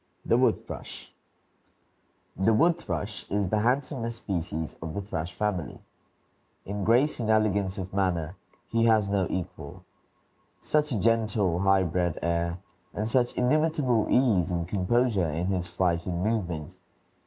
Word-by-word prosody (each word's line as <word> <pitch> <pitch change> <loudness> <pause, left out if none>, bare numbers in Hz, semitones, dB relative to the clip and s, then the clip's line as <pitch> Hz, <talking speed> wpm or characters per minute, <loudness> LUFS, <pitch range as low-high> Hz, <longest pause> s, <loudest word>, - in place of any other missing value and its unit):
THE - - +3
WOOD - - +2
THRUSH - - -9 1.2
The 95 +4 +3
wood 170 +8 +3
thrush 105 -9 -5
is 100 -1 0
the 105 - +1
handsomest 120 -1 -1
species 80 -4 -3
of 80 -1 -5
the 100 - -2
thrush 85 -3 -5
family. 105 -6 -2 0.9
In 100 +1 -4
grace 125 +9 +3
and 110 -2 -2
elegance 100 -3 +2
of 95 -1 -6
manner 90 -4 0 0.3
he 115 0 +2
has 110 -3 +4
no 100 -2 +1
equal. 95 -2 -6 0.7
Such 150 -1 0
a 115 - 0
gentle, 110 -5 +1
high 95 0 +4
bred 85 -1 -1
air, 85 0 0 0.4
and 105 +1 -1
such 120 +1 +1
inimitable 140 -3 +2
ease 105 -9 +3
and 85 -2 -2
composure 100 0 +1
in 80 +4 -2
his 90 -2 -1
flight 85 -1 0
and 90 0 -2
movement! 90 -9 -2
100 Hz, 140 wpm, -27 LUFS, 90-115 Hz, 1.2 s, has